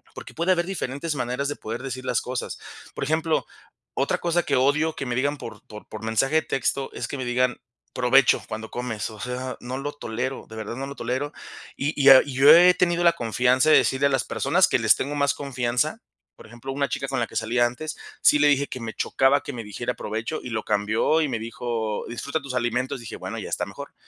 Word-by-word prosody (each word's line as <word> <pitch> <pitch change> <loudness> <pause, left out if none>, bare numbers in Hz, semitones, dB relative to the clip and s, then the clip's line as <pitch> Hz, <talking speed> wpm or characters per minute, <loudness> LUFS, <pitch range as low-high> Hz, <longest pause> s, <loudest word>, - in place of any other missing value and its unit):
porque - - -9
puede 170 +3 +2
haber 170 -1 0
diferentes 160 -4 -3
maneras 125 +2 -2
de 145 - -3
poder 115 +4 -6
decir 130 -1 -5
las 125 -1 +1
cosas. 125 0 -4 0.4
Por - - -3
ejemplo, 160 +1 0 0.5
otra - - +1
cosa 175 0 +1
que - - 0
odio 150 +4 +2
que 135 - -4
me 120 - -2
digan 145 +3 0
por 115 - -9
por 105 0 -11
por 110 0 -9
mensaje 110 +7 +1
de 160 - +5
texto 135 +1 -1
es - - -4
que 140 - -4
me 130 - -4
digan: 125 0 +1 0.3
"Provecho", 125 +1 +4
cuando 110 0 -6
comes, 120 -4 -4
o 110 -1 -12
sea, 125 +1 -4
no 125 +2 -5
lo 145 +2 -4
tolero, 130 0 -4
de 110 - -10
verdad 110 +1 -5
no 135 +1 -4
lo 140 - -8
tolero, 130 +5 -3 0.4
y 145 +3 -1
y 135 - +7
ah, 130 -1 +10
yo 135 0 +6
he 180 +1 +7
tenido 175 -1 +1
la 170 - +7
confianza 125 +5 +2
de - - +8
decirle 135 +1 +2
a - - 0
las 135 -2 +1
personas - - +2
que - - +2
les - - +5
tengo 145 +2 -3
más 140 0 +2
confianza, 130 - -1 0.4
por - - -14
ejemplo, 120 +4 -8
una 140 +1 0
chica 135 - -3
con 135 -2 -1
la 115 - 0
que - - -15
salía 120 +2 +2
antes, 140 +6 -4 0.2
sí 150 - +5
le 150 - +5
dije 140 -1 +3
que 130 - -6
me 115 -1 -5
chocaba 135 +2 +2
que 145 - -6
me 115 -2 -6
dijera 120 +4 -4
provecho, 110 +8 -4
y 125 - -6
lo 110 -1 -2
cambió, 110 +9 +1
y 150 - +1
me 120 - -2
dijo: 115 -1 -3
"Disfruta 140 +6 -3
tus 140 -2 -7
alimentos", 125 +2 -1
dije: 115 - -8
"Bueno, - - -6
ya - - -6
está - - -1
mejor", - - -10
130 Hz, 230 wpm, -24 LUFS, 120-145 Hz, 0.5 s, ah